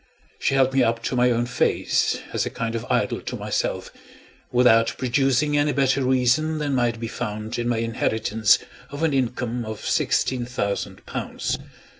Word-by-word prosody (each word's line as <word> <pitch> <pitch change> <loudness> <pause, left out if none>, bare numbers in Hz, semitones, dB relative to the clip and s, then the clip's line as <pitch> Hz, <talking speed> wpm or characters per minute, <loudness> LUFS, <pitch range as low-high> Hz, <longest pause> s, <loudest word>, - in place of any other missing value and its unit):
She 135 - +1
held 135 -1 +3
me 135 - +3
up 115 -1 +1
to 125 - -2
my 125 0 +4
own 120 0 +1
face, 125 +1 +1 0.2
as - - +1
a - - -2
kind 115 0 -3
of 115 - -4
idol - - 0
to - - -5
myself, - - -2 0.6
without 120 -2 +4
producing 135 +3 +1
any 145 0 +2
better 135 0 +2
reason 130 +5 +2
than 145 -2 -1
might 120 -3 +1
be 115 - -3
found 110 +1 -4
in 120 0 -1
my 120 - +1
inheritance 110 -1 +2 0.3
of 145 +3 -5
an 160 -3 +2
income 125 -2 -1
of 110 -1 -7
sixteen 130 -2 +1
thousand 100 -5 -3
pounds. - - -3
125 Hz, 170 wpm, -23 LUFS, 115-135 Hz, 0.6 s, my